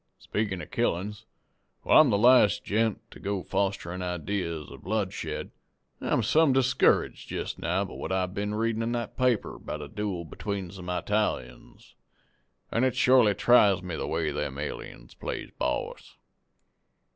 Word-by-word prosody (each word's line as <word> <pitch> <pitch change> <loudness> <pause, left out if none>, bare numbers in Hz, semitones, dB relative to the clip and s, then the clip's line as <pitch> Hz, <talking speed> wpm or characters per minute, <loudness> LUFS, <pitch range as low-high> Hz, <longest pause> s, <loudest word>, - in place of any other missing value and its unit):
"Speakin' 100 -4 -3
of - - -12
killin's, 100 +4 -1 0.6
while - - +7
I'm 150 - +4
the 100 - +3
last 120 -2 +5
gent 110 +1 0
to - - -12
go 100 -2 -2
fosterin' 95 -2 -2
idees 90 -3 -3
of - - -11
bloodshed, 100 0 -3 0.5
I'm - - +1
some 155 -3 +4
discouraged 130 -1 +2
jest - - -4
now 90 +4 0
by - - -9
what - - -5
I've 95 -1 0
been 105 +1 -2
readin' 115 0 0
in 115 +1 -1
that 120 -2 -3
paper 125 -4 +1
about 75 - -6
a - - -7
dooel 95 -2 -4
between 100 -2 -4
some 90 -2 -8
Eytalians, 90 -9 -3 0.8
an' 115 - +1
it 130 -1 +2
shorely 125 -5 +5
tries 100 -6 +5
me 90 -3 -4
the - - -3
way 80 -1 -1
them 75 -2 -3
aliens 70 -4 -7
plays - - -5
boss. 65 - -3
100 Hz, 155 wpm, -28 LUFS, 90-110 Hz, 0.8 s, while